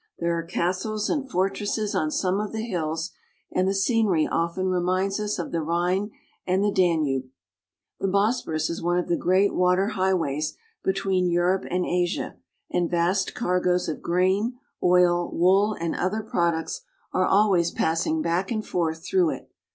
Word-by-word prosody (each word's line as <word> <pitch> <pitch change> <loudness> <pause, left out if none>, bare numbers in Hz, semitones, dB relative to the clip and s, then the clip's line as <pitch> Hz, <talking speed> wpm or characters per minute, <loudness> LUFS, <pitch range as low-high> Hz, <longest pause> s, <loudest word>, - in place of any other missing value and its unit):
There 170 0 0
are 165 - -1
castles 185 +5 -2
and 275 -3 -2
fortresses 205 +1 -1
on 155 -5 0
some 185 +4 0
of 210 0 -4
the 220 0 -3
hills, 160 -5 -2 0.4
and 185 +1 +1
the 195 - +2
scenery 195 -5 +2
often 170 +3 -1
reminds 185 +2 0
us 210 0 -2
of 175 - -4
the 165 - -1
Rhine 175 +5 0 0.4
and 185 +2 +2
the 205 - +2
Danube, 155 -9 +1 0.7
The 195 - 0
Bosporus 200 -6 +1
is 170 - -5
one 175 +1 +1
of 180 - -1
the 170 - +3
great 185 +4 +2
water 180 +2 +2
highways 175 -7 0 0.3
between 190 -1 +1
Europe 175 +2 +1
and 180 0 0
Asia, 175 0 -1 0.4
and 175 -1 +1
vast 180 +3 0
cargoes 180 -4 +1
of 155 - -4
grain, 190 +7 +1 0.2
oil, 175 -1 +3
wool, 195 +4 +3
and 165 -1 -1
other 215 +4 -1
products 170 -6 -1 0.3
are 185 - +2
always 190 -4 +3
passing 170 - 0
back 180 +3 0
and 215 -2 -2
forth 160 -2 -2
through 370 -3 +2
it. - - -6
180 Hz, 160 wpm, -25 LUFS, 170-200 Hz, 0.7 s, the